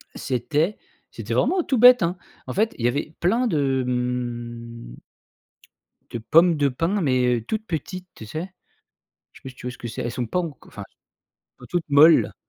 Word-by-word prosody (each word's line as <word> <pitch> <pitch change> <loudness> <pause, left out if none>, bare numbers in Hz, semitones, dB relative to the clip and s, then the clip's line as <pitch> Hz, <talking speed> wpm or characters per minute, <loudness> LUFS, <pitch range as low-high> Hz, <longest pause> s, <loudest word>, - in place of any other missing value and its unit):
C'était 150 - -1 0.3
c'était - - -5
vraiment 365 -1 +2
tout 265 - 0
bête, 245 -1 +7
hein. 175 +2 -1 0.3
En - - -4
fait, 220 +3 0
il 115 - -3
y - - +5
avait 145 +5 -2
plein 230 +8 +2
de, 140 - 0
mmh 120 - -4 1.1
de 120 - -4
pommes 165 +9 +4
de 145 -2 +2
pins, 165 +10 -1
mais 130 -5 +2
heu, 115 - -3
toutes 215 - -4
petites, 180 +3 -5
tu 110 - -10
sais, 160 - -5 0.8
je - - -16
sais - - -37
pas - - -6
si 130 - -12
tu 125 - -11
vois 125 - -3
ce - - -14
que 120 - -6
c'est? 110 - -5
Elles 120 - -3
sont 120 -1 -3
pas 180 - -1
enco 165 -5 -8
enfin, - - -9
elles - - -40 0.7
sont - - -11
toutes 175 -3 -2
molles, 150 +3 +6
145 Hz, 200 wpm, -23 LUFS, 125-180 Hz, 1.1 s, bête